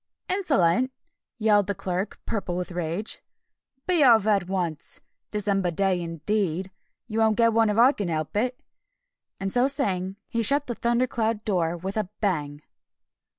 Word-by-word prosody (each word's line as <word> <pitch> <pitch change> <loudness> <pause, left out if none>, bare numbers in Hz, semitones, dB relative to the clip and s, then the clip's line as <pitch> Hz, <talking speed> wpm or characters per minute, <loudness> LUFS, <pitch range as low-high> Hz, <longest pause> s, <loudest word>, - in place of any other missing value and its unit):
"Insolent!" 260 - +2 0.5
yelled 210 -3 +3
the 205 - -1
Clerk, 185 +3 -3
purple 195 -5 -3
with 180 0 -4
rage. 175 +5 -3 0.6
"Be 350 -4 +3
off 230 -5 +6
at 200 -5 +2
once! 175 -6 -3 0.3
December 200 -3 0
day, 185 +1 0
indeed! 180 +2 -2 0.3
You 225 -2 -3
won't 220 -1 +3
get 230 -1 +4
one 225 -1 +3
if 210 - 0
I 245 +4 +7
can 205 -9 -4
help 155 0 -3
it!" 250 +4 0 0.8
And 195 0 -3
so 245 +1 +4
saying, 195 -10 -1
he 230 - -1
shut 280 +5 +4
the 240 - -3
thundercloud 235 -2 0
door 175 -4 0
with 190 +4 -5
a 210 -4 -1
bang! 150 -7 -2
205 Hz, 150 wpm, -25 LUFS, 180-230 Hz, 0.8 s, I